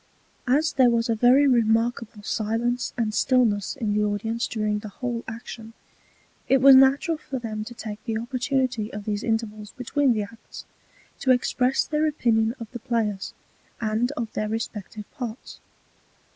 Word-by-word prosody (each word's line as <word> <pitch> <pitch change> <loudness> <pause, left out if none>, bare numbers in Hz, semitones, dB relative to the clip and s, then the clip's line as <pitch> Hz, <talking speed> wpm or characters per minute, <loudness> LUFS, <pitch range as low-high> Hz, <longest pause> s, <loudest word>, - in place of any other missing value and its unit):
As 300 +5 +2
there 255 -2 +5
was 235 0 +1
a 230 - +2
very 250 +5 +5
remarkable 230 -2 +1
Silence 230 +4 -1
and 220 -3 0
Stillness 225 -4 +2
in 220 -6 -1
the 210 0 +2
Audience 215 +3 -1
during 215 -2 -1
the 215 0 -8
whole 240 +2 -4
Action, 225 0 -8 0.8
it 270 - +5
was 270 +1 +9
natural 270 +5 +4
for 270 - -5
them 220 -3 -4
to 240 - -9
take 215 -2 -7
the 225 -2 -1
Opportunity 250 -2 -1
of 205 -1 -7
these 210 -1 -2
Intervals 215 -2 -3
between 260 +1 +1
the 215 -2 -1
Acts, 225 +3 -11 0.5
to 260 - -2
express 255 +1 +2
their 305 0 +1
Opinion 230 -6 +1
of 230 - -5
the 240 - -6
Players, 215 -4 -2 0.4
and 225 +3 0
of 230 -2 -5
their 215 0 -2
respective 215 -1 -5
Parts. 240 -2 -7
230 Hz, 160 wpm, -25 LUFS, 215-250 Hz, 0.8 s, was